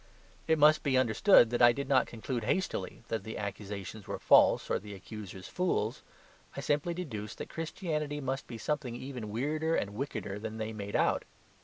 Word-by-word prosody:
It 160 0 +4
must 155 +1 +6
be 135 -3 +2
understood 120 - +5
that 120 - 0
I 120 0 +9
did 140 +2 -4
not 135 -1 +4
conclude 120 +1 -4
hastily 185 - -2
that 115 - -2
the 110 - -6
accusations 100 0 -6
were - - -3
false - - +5
or - - 0
the 105 0 -9
accusers 95 -1 -9
fools. 130 - -1 0.6
I - - -2
simply 150 +4 0
deduced 110 - -5
that - - -6
Christianity 155 -3 -3
must 135 0 -3
be 115 - -7
something 135 -1 -2
even 125 -4 -6
weirder 155 +8 0
and 100 0 -1
wickeder 105 -5 -4
than 110 +1 -5
they 110 0 -3
made 100 -1 -5
out. - - +2
120 Hz, 180 wpm, -31 LUFS, 105-150 Hz, 0.6 s, I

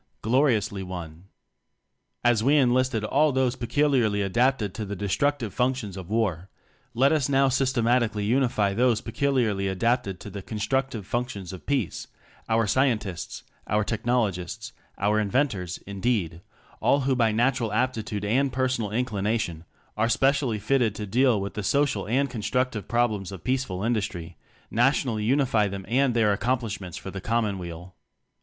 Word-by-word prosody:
gloriously 115 -5 +2
won! 90 -2 -7 1.0
As 120 -3 +3
we 140 +4 +4
enlisted 130 -3 +2
all 145 +7 +3
those 130 -1 +1
peculiarly 120 -5 +1
adapted 115 0 +1
to 110 - -5
the 100 0 -5
destructive 115 +4 -1
functions 125 -6 -1
of 95 -2 -8
War, 100 -5 -1 0.5
let 135 +4 +4
us 150 -4 +1
now 135 0 +4
systematically 120 -5 +1
unify 115 -4 +2
those 120 0 +2
peculiarly 115 -6 0
adapted 100 0 0
to 105 - -8
the 100 - -6
constructive 110 +2 -2
functions 100 -5 -4
of 95 - -11
Peace 135 -10 -1 0.4
our 115 0 +3
scientists, 105 -6 -1 0.2
our 105 +1 +1
technologists, 110 -2 -2 0.2
our 105 +2 +2
in 105 -2 -1
ventors, 100 - 0
indeed, 100 -5 -1 0.4
all 140 - +3
who 135 0 +1
by 115 -3 +3
natural 120 0 +1
aptitude 110 -3 -1
and 130 +6 +2
personal 125 -4 0
inclination 105 -7 -2 0.3
are 115 +2 +1
specially 135 -1 +2
fitted 115 0 +1
to 105 - -4
deal 120 +2 +3
with 100 0 -4
the 105 - -4
social 130 -2 +1
and 135 +5 +2
constructive 125 -1 -2
problems 110 -5 0
of 95 -4 -9
peaceful 125 -8 -1
industry; 100 -7 -2 0.4
nationally 120 -2 +1
unify 125 -4 +2
them 95 -1 -6
and 130 0 +2
their 110 -3 +3
accomplishments 110 -6 -2
for 95 - -7
the 95 - -6
Com 115 +3 +1
monweal. 90 -3 -6
115 Hz, 145 wpm, -26 LUFS, 100-130 Hz, 1.0 s, we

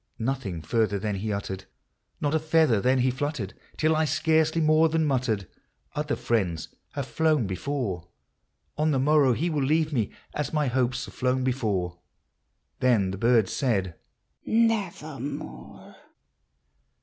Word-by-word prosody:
Nothing 110 - -3
further 110 +2 +1
then 105 0 -2
he 105 +3 -2
uttered,— 95 -2 -4 0.5
not 145 0 0
a 160 - +3
feather 155 -8 +3
then 130 +2 +3
he 130 +1 +3
fluttered,— 130 -7 -3 0.2
Till 155 0 +3
I 155 0 +2
scarcely 160 +1 +2
more 155 +1 +4
than 160 0 +1
muttered, 125 -8 0 0.3
" - - -40
Other 150 0 -1
friends 95 -9 -1 0.2
have 140 -2 -3
flown 155 -5 +1
hefore, 95 - -3 0.3
— - - -48
On 155 +1 +3
the 145 - +2
morrow 140 -1 +4
he 165 +8 -1
will 150 -2 0
leave 155 +3 +2
me, 115 -7 +1 0.2
as 150 - -2
my 150 -1 +1
hopes 125 -2 0
have 95 - -12
flown 130 0 0
before." 100 -9 -1 0.8
Then 110 -7 +3
the 95 - -5
bird 115 -2 +4
said, 100 -10 0 0.4
" - - -52
Nevermore 160 - -2
130 Hz, 150 wpm, -26 LUFS, 105-155 Hz, 0.8 s, more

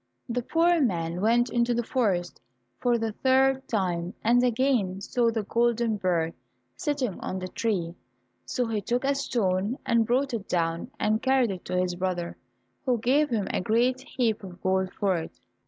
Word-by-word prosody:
The 245 0 -1
poor 335 +5 +3
man 170 -7 0
went 235 +3 +3
into 240 0 +2
the 240 - 0
forest 195 - -1 0.4
for 240 -1 +2
the 225 -1 -2
third 265 +3 +2
time, 180 -3 -1
and 245 +2 +4
again 240 -6 +1
saw 235 +4 +1
the 225 -1 -1
golden 235 0 +1
bird 170 -4 0 0.4
sitting 270 -9 -2
on 190 - -4
the 185 0 -4
tree, 185 -4 -2 0.5
so 250 - -1
he 220 -2 -2
took 245 +4 -1
a 280 +1 +2
stone 215 -5 0
and 230 -1 +2
brought 260 +2 +1
it 215 -4 -4
down 165 +3 -1
and 215 +1 +1
carried 260 -4 +3
it 185 -2 -6
to 180 - -2
his 180 -1 0
brother, 175 -1 -2 0.5
who 250 -2 +1
gave 275 +7 +2
him 215 -5 -1
a - - 0
great 245 +6 +2
heap 235 -6 -1
of 180 -2 -9
gold 190 0 +1
for 195 -3 0
it. 160 - -7
225 Hz, 175 wpm, -27 LUFS, 185-250 Hz, 0.5 s, and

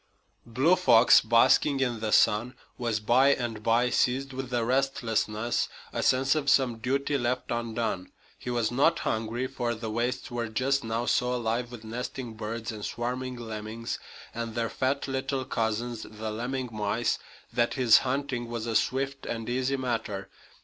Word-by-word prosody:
Blue 135 +10 +3
Fox, 120 -10 +6
basking 120 +5 +4
in 120 -4 0
the 110 0 -2
sun, 110 +5 +3 0.2
was 115 -3 -1
by 130 +6 +4
and 115 -4 -4
by 115 +3 +2
seized 135 +3 +1
with 130 -1 -5
a 120 -2 0
restlessness, 120 -3 0 0.2
a - - -1
sense 130 +1 +3
of 150 -3 0
some 130 -4 +3
duty 140 +4 0
left 125 +1 -1
undone. 115 -5 -2 0.3
He - - -6
was 120 -2 0
not 145 +7 +3
hungry, 115 +3 -2
for 125 -3 -2
the 110 0 -5
wastes 120 +3 -2
were 120 -1 -2
just 130 +5 0
now 115 +1 -2
so 125 0 +1
alive 120 +1 -1
with 120 -2 -9
nesting 120 +1 -5
birds 115 +1 -5
and 105 -2 -8
swarming 125 +3 -3
lemmings, 110 0 -5 0.3
and 115 -1 -4
their 115 -1 0
fat 135 +2 -1
little 135 0 -2
cousins, 115 0 -2
the 110 0 -5
lemming 125 +3 -3
mice, 105 +2 0 0.3
that 120 0 +1
his 125 -4 +6
hunting 130 -2 -2
was 115 -1 -4
a 115 - -2
swift 135 +3 0
and 115 -1 -4
easy 130 +2 0
matter. 115 -6 -3
120 Hz, 165 wpm, -28 LUFS, 115-130 Hz, 0.3 s, Fox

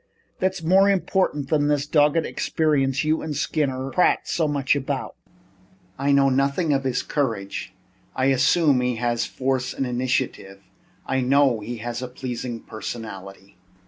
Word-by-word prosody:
"That's 190 -2 -1
more 190 +4 +5
important 185 -7 0
than 145 -2 +2
this 145 -1 +1
doggoned 150 +1 +3
experience 140 -4 0
you 155 +1 +1
and 155 -3 -4
Skinner 135 -3 -1
prate 180 - +3
so 160 -2 0
much 140 -1 +1
about." 140 -2 -3 0.8
"I 140 +1 +1
know 140 0 +5
nothing 140 +4 +1
of 135 -1 0
his 125 -1 0
courage. 115 -9 -3 0.4
I 130 - +1
assume 135 +1 +3
that 125 - 0
he 125 -1 0
has 120 0 -1
force 130 -1 -2
and 135 - -1
initiative. 125 -6 -2 0.4
I 130 - 0
know 135 -2 +3
he 115 +3 -6
has 120 0 -3
a 125 - -4
pleasing 125 -2 -5
personality." 100 -4 -8
135 Hz, 150 wpm, -23 LUFS, 120-150 Hz, 0.8 s, more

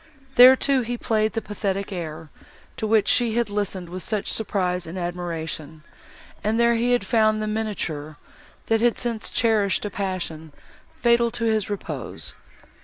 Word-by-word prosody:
There 255 +1 +9
too 270 0 +1
he 240 +1 -3
played 220 -2 0
the 225 - -2
pathetic 200 -1 -3
air, 160 -3 -6 0.5
to 220 - -2
which 215 -2 +3
she 235 -3 +2
had 235 -3 0
listened 200 -3 -2
with 180 +2 -7
such 210 0 -2
surprise 180 -5 -1
and 170 +3 -6
admiration; 165 -3 -4 0.6
and 215 +2 +1
there 235 0 +4
he 245 +1 +3
found 215 0 +2
the 215 - -2
miniature, 190 -9 -3 0.5
that 225 0 +1
had 240 0 +3
since 230 -3 -3
cherished 210 -5 +1
a 205 - -3
passion 170 -6 -4 0.5
fatal 235 0 +4
to 230 - -5
his 220 -3 +1
repose. 205 -2 -6
210 Hz, 155 wpm, -24 LUFS, 180-230 Hz, 0.6 s, There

